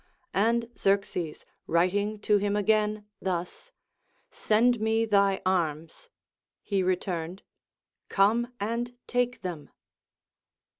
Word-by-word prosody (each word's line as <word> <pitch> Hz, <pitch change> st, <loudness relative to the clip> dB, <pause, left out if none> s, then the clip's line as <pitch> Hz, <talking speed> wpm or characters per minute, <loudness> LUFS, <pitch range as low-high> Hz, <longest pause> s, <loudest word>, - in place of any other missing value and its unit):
And 230 Hz, +3 st, +2 dB
Xerxes 195 Hz, -5 st, 0 dB, 0.2 s
writing 200 Hz, +5 st, +1 dB
to 210 Hz, -1 st, +3 dB
him 205 Hz, 0 st, 0 dB
again 210 Hz, 0 st, +1 dB, 0.2 s
thus, 180 Hz, -, -4 dB, 0.6 s
Send 235 Hz, +2 st, +2 dB
me 220 Hz, +1 st, +2 dB
thy 200 Hz, -2 st, +2 dB
arms, 165 Hz, -, -1 dB, 0.5 s
he 200 Hz, -2 st, 0 dB
returned. 180 Hz, -1 st, -2 dB, 0.7 s
Come 225 Hz, +5 st, +2 dB
and 235 Hz, +4 st, -3 dB
take 245 Hz, 0 st, -1 dB
them. 170 Hz, -5 st, -5 dB
205 Hz, 95 wpm, -28 LUFS, 185-225 Hz, 0.7 s, to